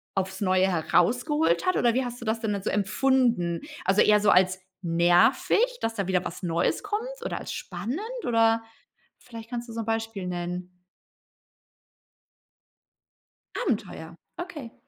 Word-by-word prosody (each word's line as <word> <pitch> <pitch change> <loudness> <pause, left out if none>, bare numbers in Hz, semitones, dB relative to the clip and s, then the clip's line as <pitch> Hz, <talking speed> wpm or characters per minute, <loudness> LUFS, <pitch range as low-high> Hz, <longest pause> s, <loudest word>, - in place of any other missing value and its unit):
aufs 190 0 -2
Neue 185 -1 +3
herausgeholt 245 - +1
hat, 370 - +2
oder 240 -1 +3
wie 260 +2 0
hast 245 0 -6
du - - -7
das 220 +1 0
denn 220 -3 -1
dann 200 -2 -4
so - - -1
empfunden? 210 -4 +1 0.2
Also, 195 +2 +4
eher 210 0 +5
so 210 0 +2
als 185 0 +4 0.2
nervig, 180 - +3
dass 225 0 -1
da 200 -4 -2
wieder 185 -1 +1
was 175 - -7
Neues 170 - 0
kommt, 420 +3 -2 0.2
oder - - -3
als - - -6
spannend 205 - -4 0.2
oder 225 -1 +3 0.6
vielleicht 230 -1 -11
kannst 240 -1 -5
du 230 - -8
so 230 - -4
'n 225 - -5
Beispiel 225 -4 -2
nennen. 180 0 -5 2.8
Abenteuer, - - -3 0.3
okay. 300 -10 -8
220 Hz, 150 wpm, -26 LUFS, 185-245 Hz, 2.8 s, eher